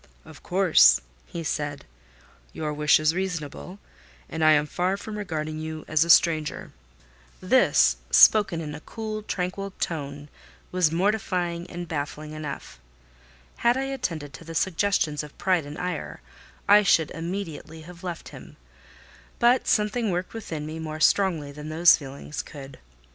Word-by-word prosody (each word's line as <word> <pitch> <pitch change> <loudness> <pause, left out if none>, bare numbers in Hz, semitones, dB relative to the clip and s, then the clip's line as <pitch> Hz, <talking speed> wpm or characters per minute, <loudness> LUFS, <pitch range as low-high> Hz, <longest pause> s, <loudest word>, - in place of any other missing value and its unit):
"Of 160 -2 -14
course," 185 -2 +5 0.3
he 170 - -6
said. 145 -2 -3 0.7
"Your 155 -1 -3
wish 150 0 +4
is 155 +1 +2
reasonable, 180 0 -4 0.5
and 160 0 -3
I 155 0 +7
am 150 0 +3
far 180 +5 -1
from 210 +1 -7
regarding 155 -6 -4
you 155 0 -6
as 155 0 +3
a 170 - -6
stranger." 160 -2 +3 0.7
This, 255 +8 +4
spoken 195 -6 +6
in 150 -2 -6
a 150 - -7
cool, 215 +4 -6
tranquil 195 0 -4
tone, 145 -3 -4 0.4
was 180 -4 +2
mortifying 180 -2 -1
and 175 0 -6
baffling 150 0 -5
enough. 150 - -7 0.8
Had 240 +2 +2
I 265 - -1
attended 160 - -4
to 150 - -10
the 165 0 -9
suggestions 170 -4 +1
of 150 -1 -12
pride 180 -6 +1
and 145 +2 -8
ire, 180 0 -5 0.5
I 205 +1 +7
should 165 -6 +3
immediately 165 -2 -6
have 175 +2 -13
left 175 -2 -6
him; - - -13 0.8
but 240 +2 +3
something 215 +1 +1
worked 180 0 -3
within 165 -9 -5
me 155 +1 -6
more 155 -1 -5
strongly 165 -5 +2
than 150 +2 -8
those 170 +2 +6
feelings 140 0 -7
could. 140 -2 -11
165 Hz, 150 wpm, -25 LUFS, 155-190 Hz, 0.8 s, I